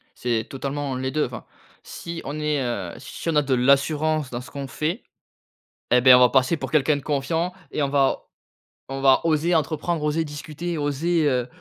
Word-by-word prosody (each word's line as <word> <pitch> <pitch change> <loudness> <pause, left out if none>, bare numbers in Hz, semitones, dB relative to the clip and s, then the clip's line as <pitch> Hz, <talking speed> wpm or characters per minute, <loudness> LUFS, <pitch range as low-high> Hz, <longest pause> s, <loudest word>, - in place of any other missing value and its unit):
C'est 115 -2 -1
totalement 140 0 -4
les 130 +1 -3
2. 150 +1 +1
Enfin, - - -8 0.4
si 170 -1 -7
on 145 +3 -4
est, 150 -2 0
heu, 100 -9 -3
si 140 +5 -6
on 165 - 0
a 150 - +5
de 135 -2 -1
l'assurance 145 +3 +2
dans 120 -1 -5
ce 125 - -13
qu'on 140 -1 -6
fait 165 - -3 0.9
et 125 - +5
bah 125 0 +8
on - - +5
va 125 - +7
passer 130 +4 +2
pour - - -6
quelqu'un 150 -1 +3
de 140 - -7
confiant 160 +5 -1 0.2
et 150 - -1
on 140 - +1
va 135 -1 +1 0.6
on 135 0 -5
va 135 -1 +5
oser 165 +2 +2
entreprendre, 160 +1 -1
oser 155 +2 0
discuter, 155 +3 -5
oser, 150 +2 +1
heu, 125 -2 0
145 Hz, 195 wpm, -23 LUFS, 130-155 Hz, 0.9 s, bah